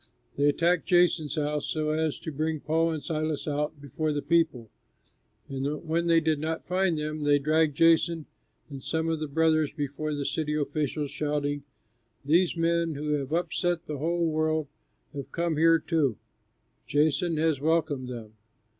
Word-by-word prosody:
They 145 +1 +3
attacked 170 +3 +1
Jason's 175 -4 +3
house, 150 -1 -1
so 155 -1 -1
as 155 -1 0
to 160 - -5
bring 155 +2 -2
Paul 165 +3 +1
and 155 -2 -3
Silas 155 -3 -2
out 150 0 -2
before 150 +3 -2
the 145 -1 -2
people, 150 -8 +1 0.8
and 140 +4 -3
when 170 +2 0
they 165 -1 +5
did 160 -2 0
not 160 +1 -3
find 180 -2 +1
them, 155 0 -3
they 145 -1 +4
dragged 155 0 +1
Jason 165 -1 +4 0.4
and 140 -2 -8
some 160 +3 -1
of 160 -1 -1
the 155 - -3
brothers 155 0 +2
before 150 +1 -3
the 145 -1 -3
city 150 +1 -1
officials, 145 -1 -2
shouting, 145 -1 -1 0.6
"These 170 +4 +3
men 165 -1 +1
who 150 +2 -4
have 145 -2 -1
upset 175 0 0
the 150 -2 -5
whole 170 +3 0
world 155 0 +1 0.5
have 140 -1 -7
come 170 -2 -1
here 165 +1 +5
too! 150 - 0 0.7
Jason 155 +3 +1
has 155 -3 +1
welcomed 155 -4 +1
them. 115 -3 -8
155 Hz, 165 wpm, -27 LUFS, 145-165 Hz, 0.8 s, they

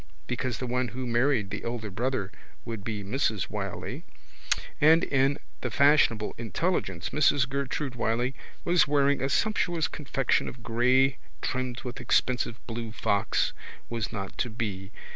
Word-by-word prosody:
(because 125 -1 -2
the 130 - -3
one 125 0 0
who 125 +3 -5
married 120 -3 +2
the - - -4
elder 115 -3 -3
brother 115 -1 -1 0.3
would 115 -4 -5
be 105 -2 -3
Mrs 110 -2 0
Wylie) - - -4 0.8
and 160 +3 +7
in 135 +1 +2 0.2
the - - -1
fashionable 140 -7 +4
intelligence 115 - -1
Mrs 145 -3 +4
Gertrude 140 0 -2
Wylie 120 +1 0 0.3
was 175 -2 +4
wearing 140 -1 +3
a 135 - 0
sumptuous 175 -4 +1
confection 135 -3 0
of 125 -2 -8
grey 125 +4 +3 0.2
trimmed 130 -1 -2
with 125 -1 -6
expensive 125 -1 +1
blue 115 -1 -5
fox 100 -3 +1 0.4
was 115 -2 -2
not 95 -4 -5
to 120 - 0
be. 100 -4 -4
125 Hz, 145 wpm, -28 LUFS, 115-140 Hz, 0.8 s, and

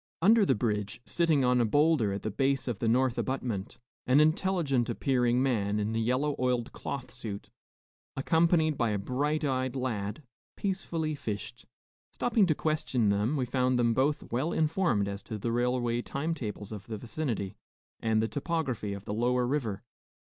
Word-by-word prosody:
Under 210 +3 +5
the - - +4
bridge, 105 -2 -2
sitting 160 -6 +2
on 125 0 +3
a - - +4
bowlder 145 -2 +3
at 100 - -4
the 110 - -2
base 135 +4 0
of 120 -6 -2
the 115 - 0
north 125 +1 +2
abutment, 120 -7 -3 0.3
an 130 +3 +5
intelligent 155 -5 +2
appearing 125 -2 +2
man 105 -6 +1
in 105 +2 -1
a - - +1
yellow 130 +6 +1
oiled 125 -2 0
cloth 125 -3 -6
suit, 110 -5 -6 0.7
accompanied 160 +1 +2
by 120 -2 +2
a 105 - 0
bright 145 +9 -1
eyed 130 -1 -1
lad, 120 0 -3 0.3
peacefully 170 -5 -2
fished. 120 -1 -6 0.4
Stopping 220 -5 +2
to 155 - +2
question 140 -9 0
them, 105 +8 +1
we 130 - 0
found 125 0 +1
them 120 -1 +3
both 140 +5 0
well 130 +8 0
informed 155 - +1
as 100 0 -5
to 110 - -6
the 115 +3 -2
railway 120 0 +1
time 155 +6 -2
tables 105 -7 -6
of 105 -1 -8
the 110 -2 -4
vicinity 115 -5 -3 0.4
and 110 -1 +1
the - - +1
topography 140 - -2
of 100 0 -8
the - - -3
lower 125 +3 +1
river. 120 -7 -2
125 Hz, 170 wpm, -29 LUFS, 110-150 Hz, 0.7 s, Under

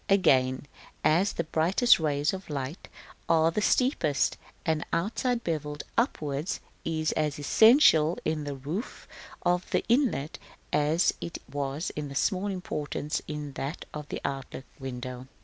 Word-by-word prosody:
Again, 130 -9 +3 0.4
as 175 +6 +3
the 170 - -1
brightest 170 +10 +4
rays 150 -1 +1
of 190 -3 -7
light 140 +3 -4 0.4
are 165 0 +4
the 210 - -1
steepest, 160 - +2 0.3
the 160 -1 +1
outside 235 +6 0
bevel 150 -3 -2 0.2
upwards 155 - -1 0.2
is 155 -1 0
as 150 -2 -1
essential 165 - +6
in 155 -1 0
the 145 -1 -4
roof 155 - -5 0.4
of 180 +1 +1
the - - 0
inlet 235 - +1 0.3
as 155 +4 +3
it 170 - -5
was 140 +2 -2
of 145 -2 -4
small 195 +3 +1
importance 150 -6 -3
in 150 -1 -5
that 140 +5 -5
of 150 -1 -7
the - - -4
outlook 135 -1 -4
window. 125 -1 -6
155 Hz, 135 wpm, -28 LUFS, 145-180 Hz, 0.4 s, essential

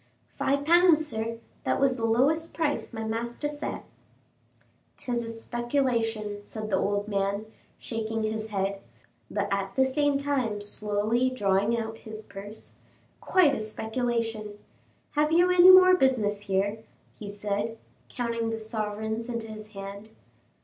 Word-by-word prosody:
"Five 280 +1 0
pounds, 340 -1 +5
sir; 230 -4 -3 0.3
that - - 0
was 270 -2 +3
the 230 -2 -1
lowest 285 +9 +2
price 315 -3 -1
my 225 -2 -5
master 235 +5 -3
set." 295 0 -4 1.1
"'Tis 240 -2 -2
a 230 - -5
speculation," 230 -3 -1
said 215 0 -6
the 190 - +3
old 205 +1 0
gentleman, 200 0 -1 0.3
shaking 225 -1 -3
his 220 0 -2
head, 195 -1 -2 0.5
but 205 -1 -1
at 195 -1 -1
the 265 - +4
same 285 +2 +2
time 265 -7 -1
slowly 210 +4 0
drawing 205 -1 +1
out 225 -1 -4
his 220 0 -9
purse, 205 +2 -9 0.4
"quite 355 -7 +4
a - - -1
speculation! 220 -1 -2 0.5
Have 300 +1 +1
you 350 +2 +5
any 360 0 +8
more 370 0 +9
business 220 - +1
here?" 200 +2 0 0.4
he 210 - -7
said, 205 +2 -3 0.3
counting 230 -2 -2
the 225 - -2
sovereigns 220 +1 -3
into 230 -2 -4
his 215 0 -8
hand. 200 0 -8
225 Hz, 140 wpm, -27 LUFS, 210-260 Hz, 1.1 s, more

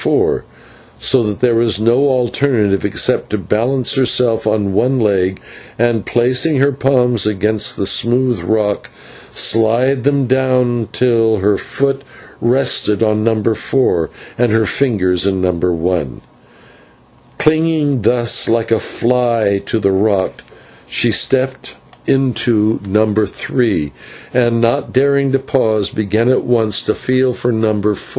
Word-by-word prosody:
4, - - 0 0.5
so 130 -2 +2
that 105 -3 -4
there 125 -2 +3
was 115 -3 +1
no 120 +6 +2
alternative 120 -5 0
except - - 0
to 105 - -2
balance 115 +7 0
herself 125 -4 +1
on 105 -2 0
one 130 +6 +1
leg, 95 -4 0 0.4
and, 115 -2 0
placing 125 +6 +1
her 140 +2 +2
palms 125 -5 +1
against 105 +1 -1
the 100 - -2
smooth 120 +4 +1
rock, 105 -2 -1 0.4
slide 115 +4 +1
them 140 -1 +1
down 125 -2 +1
it - - -22
till 115 -3 +1
her 100 +1 +1
foot 135 +3 -2 0.4
rested 120 -4 +1
on 110 -1 0
No. 110 -1 0
4, 110 -6 -1 0.3
and 120 -2 +2
her 110 0 +2
fingers 95 -8 +1
in 95 -1 -1
No. 90 0 +1
1. 85 -5 -2 1.2
Clinging 155 -4 +1
thus 120 +2 +2
like 115 0 0
a 115 - +3
fly 115 -5 0
to - - -1
the 100 -2 +1
rock, 95 0 0 0.5
she - - 0
stepped 130 0 -1 0.3
into 120 -5 +1
No. 105 +2 +1
3, 100 - -2 0.4
and, 120 -2 +1
not 115 0 0
daring 140 +1 +1
to 135 - +2
pause, 110 -6 0
began 110 +2 -1
at 130 - +2
once 110 -4 +1
to 110 - -2
feel 130 0 0
for 120 +1 -2
No. 110 -2 0
4. - - -5
115 Hz, 140 wpm, -15 LUFS, 105-130 Hz, 1.2 s, there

